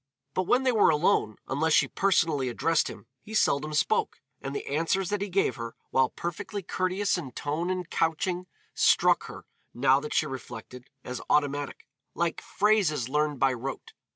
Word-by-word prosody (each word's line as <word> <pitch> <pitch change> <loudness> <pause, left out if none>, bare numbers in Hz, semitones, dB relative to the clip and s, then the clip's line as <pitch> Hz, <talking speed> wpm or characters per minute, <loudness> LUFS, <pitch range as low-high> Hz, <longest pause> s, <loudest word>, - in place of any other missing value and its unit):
But 185 -1 -1
when 255 +2 +3
they 260 - +3
were 220 -4 +5
alone, 150 - +2
unless 155 +5 +1
she - - +5
personally 165 -9 +1
addressed 160 +7 +1
him, - - -10 0.2
he 220 - -8
seldom 150 -6 +2
spoke, 150 - +1 0.2
and 135 +1 -5
the - - -4
answers 165 +6 0
that 205 -1 -1
he 200 - -2
gave 180 - +1
her, 115 -1 -6 0.2
while 130 -1 +3
perfectly 175 +4 -5
courteous 185 +2 0
in 130 -7 -8
tone 155 +7 -2
and 185 -2 -2
couching, 175 +3 -1 0.3
struck - - +4
her, - - -10 0.3
now 130 +2 +4
that 150 +1 -5
she - - +3
reflected, 125 -2 -8
as 125 -1 -5
automatic, 145 -1 0 0.3
like 170 -1 -1
phrases 190 - +1
learned 150 -1 0
by 135 -1 +3
rote. 130 +2 -6
155 Hz, 170 wpm, -28 LUFS, 135-185 Hz, 0.3 s, were